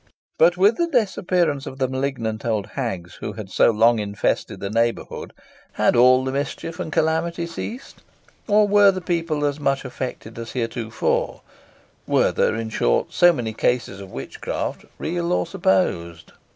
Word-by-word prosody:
"But 175 +2 +5
with 205 +5 +4
the 340 - +1
disappearance 180 - 0
of 130 - -7
the 130 -1 +1
malignant 130 -4 -3
old 110 -4 -1
hags 95 - -4
who - - -4
had - - -8
so - - +4
long 115 +1 +4
infested 100 -1 -2
the 100 0 -4
neighbourhood, 115 +1 -1 0.4
had - - +2
all 130 +2 +6
mischief 140 +5 -4
and 165 -3 -4
calamity 160 +2 0
ceased, 225 +10 -7 0.5
or 210 -1 +4
were 200 -2 +5
people 165 -4 -1
as 145 0 -1
much 140 -1 0
afflicted 125 -3 -6
as 115 0 -7
heretofore? 115 -2 -2 0.7
Were - - +3
there, - - +1
in 110 0 -4
short, - - +1
so 175 0 +6
many 120 -8 -3
cases 120 -4 -1
of 95 - -10
witchcraft, 65 +1 -5
real 170 +1 -2
or - - +1
supposed?" 90 - 0
135 Hz, 150 wpm, -22 LUFS, 115-175 Hz, 0.7 s, all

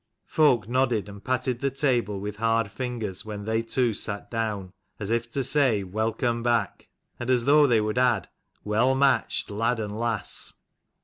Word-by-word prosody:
Folk 135 -9 +3
nodded 120 -5 +1
and 100 0 -11
patted 130 -1 0
the 140 - 0
table 120 -7 0
with 105 +1 -5
hard 115 0 +1
ringers 115 -7 -3
when 105 -1 -6
they 110 +1 +1
two 115 +1 0
sat 100 0 -4
down, 105 -5 -3 0.3
as 105 0 -3
if 115 0 0
to 135 +3 -1
say 130 -6 +3
st 90 -1 -12
Welcome 115 +2 0
back! 115 -4 0 0.2
" - - -45
and 120 - -4
as 125 -2 +2
though 145 +1 +6
they 120 -4 +4
would 110 +3 -1
add, 120 -8 +2 0.4
"Well 115 +6 +2
matched, 135 -5 +2
lad 115 +3 0
and 105 -1 -4
lass!" 115 -2 -2
115 Hz, 180 wpm, -26 LUFS, 105-125 Hz, 0.4 s, though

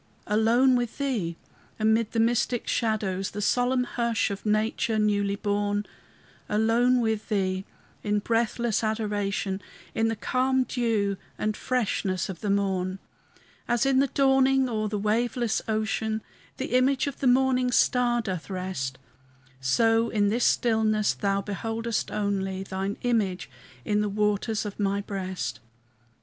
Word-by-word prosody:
Alone 230 +5 +4
with 240 -2 -2
Thee, 220 -13 -2 0.4
amid 220 0 +2
the 230 - -1
mystic 240 +1 +1
shadows, 200 -4 0
The 205 - -6
solemn 250 +4 +2
hush 235 -3 0
of 200 +2 -5
nature 220 +2 +1
newly 205 -1 +1
born; 205 0 -1 0.6
Alone 235 +4 +3
with 220 -1 -1
Thee 190 -2 0 0.4
in 210 0 0
breathless 230 +1 0
adoration, 205 -3 -1 0.3
In 225 - +1
the 225 - 0
calm 260 +3 +1
dew 225 -5 0 0.2
and 215 0 -1
freshness 200 -8 -1
of 180 -3 -6
the 210 - -2
morn. 190 -2 0 0.7
As 240 +2 +2
in 270 -1 +3
the 275 - +3
dawning 270 0 +3
o'er 215 -3 -1
the 210 0 -2
waveless 225 +2 0
ocean 220 0 -1 0.3
The 250 - -2
image 265 +2 +3
of 280 -2 -5
the 270 - +1
morning 255 0 +3
star 240 -1 +3
doth 185 -5 -4
rest, 180 -9 -3 0.6
So 225 - +2
in 205 -2 +2
this 235 +3 +1
stillness 215 -3 +2
Thou 200 -1 0
beholdest 225 +3 -2
only 195 -2 -2
Thine 195 +1 -3
image 205 - 0 0.3
in 210 0 +1
the 210 - 0
waters 210 +1 0
of 205 0 -6
my 200 0 +1
breast. 185 - -4
215 Hz, 135 wpm, -26 LUFS, 200-240 Hz, 0.7 s, Alone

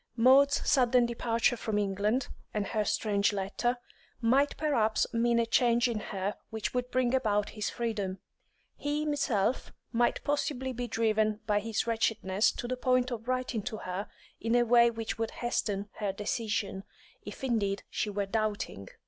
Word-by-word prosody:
Maud's 265 +4 +5
sudden 250 -3 +4
departure 235 0 +1
from 220 -2 -2
England, 210 +5 0 0.3
and 210 -1 0
her 215 -1 0
strange 205 -1 +1
letter, 205 +5 -1 0.4
might 265 +5 +2
perhaps 235 -8 +2
mean 235 0 +2
a 230 - +3
change 235 +1 +3
in 230 -3 -2
her 200 -1 -3
which 220 -1 -3
would 250 0 -1
bring 255 -1 +1
about 210 -6 +1
his 210 -1 -3
freedom; 210 -5 -3 0.6
he 290 +1 -2
himself 260 -7 0 0.2
might 240 0 +1
possibly 275 -3 -1
be 245 0 -4
driven 215 -1 +1
by 210 -1 +2
his 220 +1 -2
wretchedness 220 -3 +1
to 240 - -5
the 255 - -1
point 255 0 +2
of 230 -1 -5
writing 255 -3 -1
to 215 - -5
her 185 +1 -4 0.3
in 230 +1 0
a 240 0 +4
way 235 0 +6
which 225 -1 -4
would 225 -1 0
hasten 205 -4 -2
her 205 -2 0
decision, 205 -1 -2 0.4
if - - -9
indeed 205 -6 0
she 210 - -2
were 200 0 -1
doubting. 205 - -2
230 Hz, 160 wpm, -30 LUFS, 210-245 Hz, 0.6 s, way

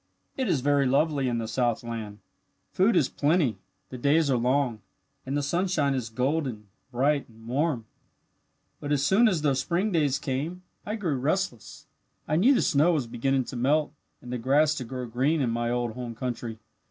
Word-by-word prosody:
"It 260 -2 -1
is 145 -7 +1
very 140 0 +2
lovely 140 0 +2
in 120 - -1
the 115 -1 -3
southland. 115 -3 -2 0.5
Food 195 +5 +3
is - - +4
plenty, 145 - +1 0.3
the 125 - -8
days 145 +2 +3
are - - +3
long, 125 -1 +1 0.5
and 140 +2 -1
the 145 - -1
sunshine 170 -2 +1
is 125 -4 -3
golden, 125 -3 -2 0.2
bright, 140 +3 +1
and 115 0 -16
warm. 135 -2 0 0.9
"But 145 - -5
as 140 -1 +2
soon 210 +9 +5
as 175 -8 0
the 145 -2 +3
spring 175 +10 0
days 150 -6 +2
came 150 +7 -4 0.2
I 210 - -2
grew 175 -10 -1
restless. 140 - -2 0.4
I 150 - +1
knew 240 - +5
the - - +2
snow 165 +1 +3
was 145 -6 0
beginning 130 +3 0
to 125 - -8
melt 145 +5 +1 0.3
and 125 0 -7
the 125 - -2
grass 145 +5 +3
to 130 - -3
grow 125 +1 -5
green 130 +7 0
in 125 -4 +1
my 120 0 -1
old 120 -1 -1
home 120 -1 -6
country. 120 -2 -4
135 Hz, 185 wpm, -27 LUFS, 120-155 Hz, 0.9 s, soon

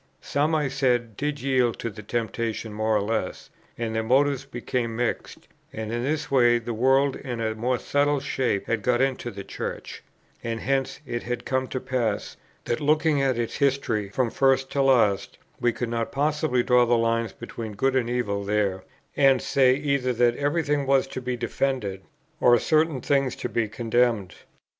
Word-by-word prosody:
Some, 150 +3 0
I 150 -2 +1
said, 125 -4 0
did 145 +1 -3
yield 130 -3 +2
to 115 - -4
the 105 - -10
temptation 115 0 -3
more 110 +1 0
or 100 - 0
less, 105 -3 -3 0.3
and 115 -1 -3
their 110 - 0
motives 135 +3 +2
became 120 -2 -3
mixed; 120 0 -3 0.2
and 110 0 -5
in 120 +1 -2
this 145 0 -2
way 120 -3 +5
the 120 0 -4
world 135 +4 +3
in 125 -4 -6
a 110 -1 -1
more 125 +3 -1
subtle 145 +3 +1
shape 130 -7 -1
had 115 -2 -1
got 120 +2 +1
into 130 -2 0
the 100 -3 -8
Church; - - -6 0.4
and 115 -1 -3
hence 135 +1 -1
it 120 -2 -3
had 125 0 -4
come 130 0 0
to 130 - -3
pass, 125 -5 -2 0.3
that, 120 - -1
looking 150 0 +2
at 130 -3 +1
its 115 -1 -2
history 130 -7 0
from 120 +2 0
first 135 0 +2
to 140 - +1
last, 115 -8 +2 0.2
we 120 - +2
could 120 +1 -4
not 115 -1 -2
possibly 145 -3 +1
draw 125 0 +4
the 120 0 +3
line 115 0 +1
between 115 -2 -6
good 135 +6 0
and 120 -3 +1
evil 105 -5 -1
there, 100 -2 0 0.3
and 135 -2 +5
say 130 0 +3
either 140 -3 0
that 120 0 +3
every 145 +5 0
thing 145 -2 0
was 135 -1 +3
to 130 -1 -6
be 125 0 -3
defended, 120 -6 -2 0.4
or 120 0 +6
certain 155 +1 +1
things 135 0 +1
to - - -4
be 115 -2 -1
condemned. 115 -3 0
125 Hz, 185 wpm, -25 LUFS, 115-135 Hz, 0.4 s, or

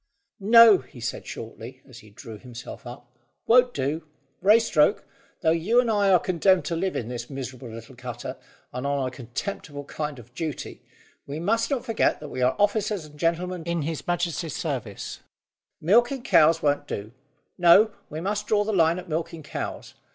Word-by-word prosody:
"No," 225 0 +8
he 130 -1 -14
said 115 0 -5
shortly, 115 +3 -9
as 125 -3 -12
he 110 - -16
drew 110 +1 -11
himself 120 0 -10
up; 120 0 -11 0.3
"won't 250 +1 +5
do, 150 - -3 0.4
Raystoke, 210 -4 +4 0.4
though 160 -3 +3
you 180 +9 +2
and 240 -2 +2
I 205 -2 +3
are 185 - +7
condemned 185 +2 +2
to 170 - -2
live 190 +3 -1
in 115 - -3
this 120 -1 -6
miserable 130 -2 -7
little 115 +3 -10
cutter, 120 -1 -6 0.4
and 125 +2 -3
on 140 -2 0
a - - -5
contemptible 145 - -6
kind 150 0 -5
of 120 0 -14
duty, 155 -1 -5 0.5
we 145 +2 -5
must 225 +7 +1
not 275 -4 -1
forget 225 -1 +1
that 150 - -8
we 130 - -5
are 125 +1 +3
officers 205 -3 +1
and 150 -1 -15
gentlemen 175 +2 -1
in 170 -2 -1
His 160 0 -4
Majesty's 175 -2 -1
service. 130 - -4 0.6
Milking 240 - +3
cows 165 -9 +4
won't 145 0 +1
do. 105 -3 -5 0.5
No; 190 +5 +7 0.2
we 155 +2 -5
must 205 +3 -2
draw 210 -1 +3
the 215 +1 -2
line 165 -2 +3
at 185 - -7
milking 160 0 -4
cows. - - -6
160 Hz, 175 wpm, -25 LUFS, 130-195 Hz, 0.6 s, No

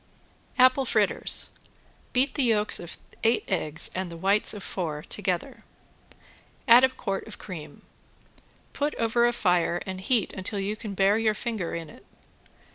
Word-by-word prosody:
~APPLE 255 +1 +5
FRITTERS~ 215 -4 0 0.6
Beat 260 +2 +2
the - - 0
yolks 220 -4 +2
of 170 - -7 0.3
eight 230 +1 +3
eggs 160 -5 +1
and 185 -1 -3
the 170 - -8
white 195 +4 +2
of 205 -3 -7
four 155 -5 -4
together. 180 -1 -3 1.1
Add 240 +1 +8
a 260 - +6
quart 195 -6 -4
of 220 - -9
cream. 170 -6 -9 0.9
Put 295 +1 -1
over 235 +1 +2
a - - +2
fire 180 -5 +1
and 185 -1 -5
heat 220 +1 +1
until 190 +2 -2
you 200 +2 -2
can 210 -2 -7
bear 195 +3 +3
your 220 -1 +2
finger 220 -9 -3
in 165 -1 -5
it. 150 - -15
205 Hz, 155 wpm, -27 LUFS, 185-235 Hz, 1.1 s, Add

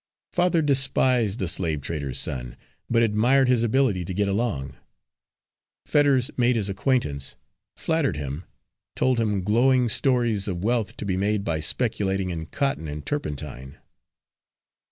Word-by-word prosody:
Father 175 -2 +2
despised 130 -6 +2
the 95 - -2
slavetrader's 75 -5 -2
son, - - -3 0.3
but 115 0 +3
admired 120 +5 +3
his 125 -2 +3
ability 115 -5 +1
to 90 - -5
get 100 +1 +1
along. 95 - -2 1.1
Fetters 140 -4 +3
made 125 0 +2
his 105 -3 -1
acquaintance, 95 - -1 0.4
flattered 160 - 0
him, 70 +3 -5 0.5
told 130 -2 +1
him 105 -4 0
glowing 125 +5 +3
stories 120 -5 +1
of 90 -2 -3
wealth 115 -2 0
to - - -5
be 95 -2 -1
made 100 +1 0
by 80 -5 -1
speculating 95 +3 -1
in 80 -2 -5
cotton 135 - -1
and 75 0 -6
turpentine. 70 - -5
105 Hz, 135 wpm, -24 LUFS, 85-125 Hz, 1.1 s, but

